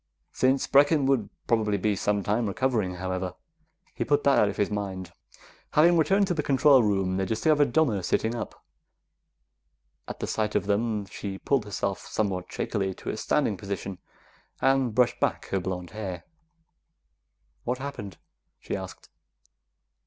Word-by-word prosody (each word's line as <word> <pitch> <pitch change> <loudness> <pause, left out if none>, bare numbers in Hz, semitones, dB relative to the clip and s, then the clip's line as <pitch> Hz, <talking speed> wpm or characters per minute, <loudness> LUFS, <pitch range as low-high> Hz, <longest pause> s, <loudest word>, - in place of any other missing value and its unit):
Since 130 +1 +2
Brecken 145 +1 +4
would 130 -7 +1 0.2
probably 110 -3 +1
be 105 +2 +1
some 100 +1 0
time 110 +3 0
recovering, 105 -4 0
however, 95 0 -3 0.6
he - - -2
put 145 -1 +1
that 140 -1 +4
out 105 - +4
of - - -6
his 105 - 0
mind. 95 -3 -4 0.6
Having 170 +3 +6
returned 195 +5 +3
to 185 - 0
the 160 - 0
control 140 -1 +5
room, 95 -3 +1
they 95 - 0
discovered 145 +6 +2
Donna 125 -10 +2
sitting 110 +5 0
up. 120 - -7 1.4
At - - -7
the - - -2
sight 105 -1 -1
of - - +1
them, 105 0 0
she 100 -1 -6
pulled 135 +1 0
herself 100 -1 -2
somewhat 95 -4 -2
shakily 95 -2 -2
to - - -7
a - - -4
standing 110 -3 +1
position, 100 -1 -5 0.6
and 135 -4 +2
brushed 125 0 +3
back - - 0
her 95 - 0
blonde 90 -1 -5
hair. 95 -5 -5 1.4
"What 125 +1 -1
happened?" 130 -8 -7 0.4
she - - -4
asked. 95 -1 -8
105 Hz, 150 wpm, -27 LUFS, 95-135 Hz, 1.4 s, Having